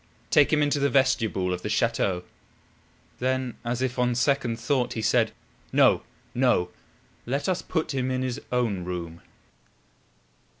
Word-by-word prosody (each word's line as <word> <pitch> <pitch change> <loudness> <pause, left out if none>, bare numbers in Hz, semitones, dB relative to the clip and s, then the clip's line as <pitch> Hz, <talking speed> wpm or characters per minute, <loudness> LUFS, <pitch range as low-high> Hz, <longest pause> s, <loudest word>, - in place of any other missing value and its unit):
"Take 145 - +5
him 150 -1 +3
into 145 0 +1
the 140 0 +2
vestibule 115 -9 +2
of 90 - -4
the 105 - -4
chateau." 105 -5 +1 1.0
Then 130 -1 -1
as 120 +2 -2
if 125 -1 -2
on 125 -1 +2
second 125 -2 +1
thought, 125 +1 0
he 110 - -3
said: 110 +1 +3 0.4
"No! - - +5 0.3
no! 120 -9 +2 0.6
Let 140 +7 -1
us 185 -1 0
put 160 -3 -2
him 130 -1 -1
in 130 0 -1
his 130 +2 -3
own 115 -7 0
room." 85 -2 -5
125 Hz, 145 wpm, -26 LUFS, 110-135 Hz, 1.0 s, Take